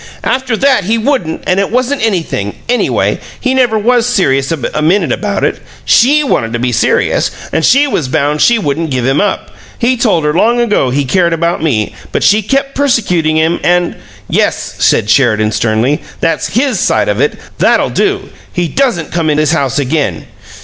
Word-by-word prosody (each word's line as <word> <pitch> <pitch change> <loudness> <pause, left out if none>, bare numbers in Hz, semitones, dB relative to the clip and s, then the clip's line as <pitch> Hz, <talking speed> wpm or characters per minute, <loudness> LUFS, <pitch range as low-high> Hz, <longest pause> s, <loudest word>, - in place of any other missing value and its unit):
After 260 -3 -1
that 265 -7 +2
he 220 +4 +1
wouldn't, 225 - -1
and 185 +1 +1
it 200 - 0
wasn't 255 +2 -1
anything, 165 - -2
anyway 245 +1 0 0.2
he 255 -1 0
never 245 -4 +2
was 240 +2 +2
serious 135 - +1
a 155 -1 -3
minute 170 +3 +1
about 205 -2 -2
it. - - 0 0.3
SHE 290 +5 +4
wanted 185 - 0
it - - -9
to 120 - -2
be 125 - 0
serious, 120 - +1 0.2
and 160 - 0
she 275 - +4
was 165 - -2
bound 150 +1 0
she 240 - +4
wouldn't 160 -4 -2
give 130 -3 -1
him 135 +2 +2
up. 205 -2 -2 0.3
He 250 +2 +1
told 210 -9 +1
her 150 - +1
long 230 +8 +2
ago 210 - +1
he 140 +2 -1
cared 170 +4 +1
about 170 0 -1
me, 115 -10 -1 0.2
but - - -1
she 210 +2 +4
kept 275 +6 -1
persecuting 180 - +1
him 160 +2 +1
and 175 0 +1 0.2
" - - -23
"Yes," - - -1
said - - +2
Sheridan, 110 -3 +2
sternly; 115 +6 0 0.2
"that's 165 - 0
HIS 260 +2 +1
side - - +1
of - - 0
it! 445 - 0 0.2
That'll - - +2
do! 395 -1 -1 0.2
He 175 -2 -1
doesn't 240 - -1
come 165 -2 -1
in 150 - +1
this 155 -1 +2
house 140 -7 0
again!" 145 +1 -1
175 Hz, 190 wpm, -12 LUFS, 145-240 Hz, 0.3 s, SHE